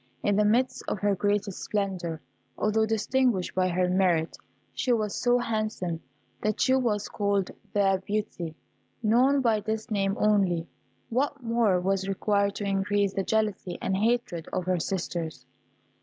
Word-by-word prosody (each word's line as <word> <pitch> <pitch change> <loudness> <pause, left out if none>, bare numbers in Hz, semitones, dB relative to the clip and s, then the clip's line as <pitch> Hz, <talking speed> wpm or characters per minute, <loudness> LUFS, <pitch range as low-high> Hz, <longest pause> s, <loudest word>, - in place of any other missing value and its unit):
In 205 - +2
the 210 - +4
midst 255 +4 +2
of - - -1
her 205 +1 +1
greatest 205 0 0
splendour, 185 -6 -2 0.4
although 220 +1 +2
distinguished 225 -2 +1
by 185 0 +2
her 180 0 +1
merit, 180 -3 +2 0.4
she 255 - 0
was 215 -3 +1
so 245 0 +2
handsome 215 -8 -2 0.4
that 215 -1 -1
she 260 - +3
was 230 -6 +1
called 200 -2 0 0.2
"The 195 -2 +2
Beauty." 200 -6 -3 0.5
Known 255 +6 +4
by 225 -4 +3
this 220 +2 -4
name 195 -1 0
only, 190 -6 +2 0.4
what 275 +3 -1
more 230 -5 +2
was 195 +1 0
required 200 +1 +1
to - - -4
increase 200 0 +1
the 195 - 0
jealousy 210 -3 -1
and 190 - -1
hatred 215 -5 0
of 180 - -2
her 185 -1 +1
sisters? 170 -2 -3
205 Hz, 150 wpm, -27 LUFS, 185-220 Hz, 0.5 s, the